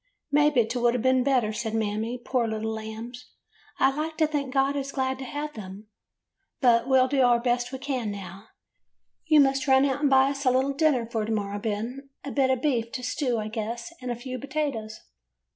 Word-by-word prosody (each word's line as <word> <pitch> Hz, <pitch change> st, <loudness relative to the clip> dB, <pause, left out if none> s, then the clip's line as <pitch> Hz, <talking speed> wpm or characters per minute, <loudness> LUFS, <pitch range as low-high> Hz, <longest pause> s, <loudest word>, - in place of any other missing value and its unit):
" -, -, -55 dB
'Maybe 295 Hz, -5 st, +4 dB
't 240 Hz, +3 st, -3 dB
would 240 Hz, 0 st, +3 dB
a' -, -, +2 dB
been 260 Hz, +1 st, +2 dB
better,' 250 Hz, -5 st, +1 dB
said 220 Hz, 0 st, -3 dB
Mammy. 220 Hz, +2 st, -1 dB
'Poor 245 Hz, -1 st, -1 dB
little 220 Hz, 0 st, -3 dB
lambs! 220 Hz, +3 st, -7 dB, 0.5 s
I 270 Hz, 0 st, +3 dB
like 310 Hz, +1 st, -3 dB
to 315 Hz, -, +4 dB
think 290 Hz, -3 st, -2 dB
God 270 Hz, +1 st, +2 dB
is 275 Hz, -1 st, -3 dB
glad 265 Hz, -1 st, -1 dB
to 265 Hz, -, -6 dB
have 295 Hz, +3 st, -5 dB
them. 205 Hz, 0 st, -10 dB, 0.7 s
But 240 Hz, -2 st, +4 dB
we 265 Hz, -, +5 dB
'll 255 Hz, -, +4 dB
do 275 Hz, +1 st, -1 dB
the 245 Hz, -2 st, +4 dB
best 245 Hz, 0 st, 0 dB
we 265 Hz, -, -4 dB
can, 260 Hz, -4 st, -3 dB
now. 195 Hz, 0 st, -8 dB, 0.8 s
Y 310 Hz, -, +6 dB
ou -, -, +9 dB
must 270 Hz, +1 st, +2 dB
run 265 Hz, 0 st, +5 dB
out 280 Hz, +1 st, -1 dB
and 290 Hz, -, +3 dB
buy 265 Hz, 0 st, +5 dB
us 275 Hz, 0 st, -5 dB
a 260 Hz, -, +4 dB
little 260 Hz, +2 st, +1 dB
dinner 275 Hz, -5 st, +2 dB
for 225 Hz, -2 st, -2 dB
to 220 Hz, -, -3 dB
morrow, 205 Hz, -1 st, -2 dB
Ben. 230 Hz, +6 st, -4 dB
A 280 Hz, -, -5 dB
bit 270 Hz, -2 st, +2 dB
of 260 Hz, -1 st, 0 dB
beef 235 Hz, -6 st, 0 dB
to 255 Hz, -2 st, -4 dB
stew, 250 Hz, -1 st, -1 dB
I 215 Hz, -1 st, -3 dB
guess, 230 Hz, +5 st, -5 dB
and 250 Hz, -, -5 dB
a 240 Hz, -, -1 dB
few 255 Hz, +1 st, -6 dB
potatoes. 270 Hz, -6 st, -3 dB
255 Hz, 225 wpm, -26 LUFS, 225-275 Hz, 0.8 s, ou